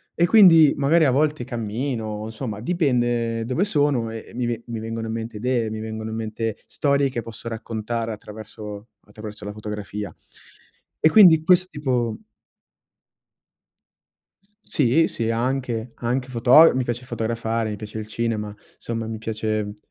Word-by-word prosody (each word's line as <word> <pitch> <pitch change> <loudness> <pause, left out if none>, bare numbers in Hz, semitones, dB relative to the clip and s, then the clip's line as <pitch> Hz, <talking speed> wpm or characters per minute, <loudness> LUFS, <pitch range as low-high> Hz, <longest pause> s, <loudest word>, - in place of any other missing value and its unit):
E 170 - +3
quindi 165 -7 +7
magari 155 +3 +3
a 130 - +4
volte 145 -2 +1
cammino, 115 -2 -3
insomma 110 -1 -5
dipende 120 -6 0
dove 130 +10 0
sono 145 - +1
e 115 -1 -7
e - - -15
mi 120 0 -2
ve 120 -1 -3
mi 115 -2 -4
vengono 115 0 -4
in 110 - -3
mente 115 -1 -5
idee, 120 -1 0
mi 110 0 -5
vengono 110 0 -5
in 110 - -5
mente 110 0 -3
storie 140 -1 +1
che 120 -2 -3
posso 115 +1 -9
raccontare 115 0 -4
attraverso 105 0 -9 0.2
attraverso 105 0 -10
la 105 - -5
fotografia. 105 -3 -6 0.9
E 155 - +6
quindi 165 -7 +7
questo 180 +2 +4
tipo 125 -6 -1 2.5
Sì, 145 +4 +2
sì, 115 -1 -3
anche, 120 -1 -2
anche 125 +2 -2
foto 130 +6 +6
mi 130 - +1
piace 120 +1 -4
fotografare, 115 -1 -2
mi 105 - -3
piace 105 +1 -8
il 110 0 -5
cinema, 110 -2 -2 0.2
somma 115 -1 -4
mi 110 - -4
piace 110 -1 -3
115 Hz, 150 wpm, -23 LUFS, 110-130 Hz, 2.5 s, quindi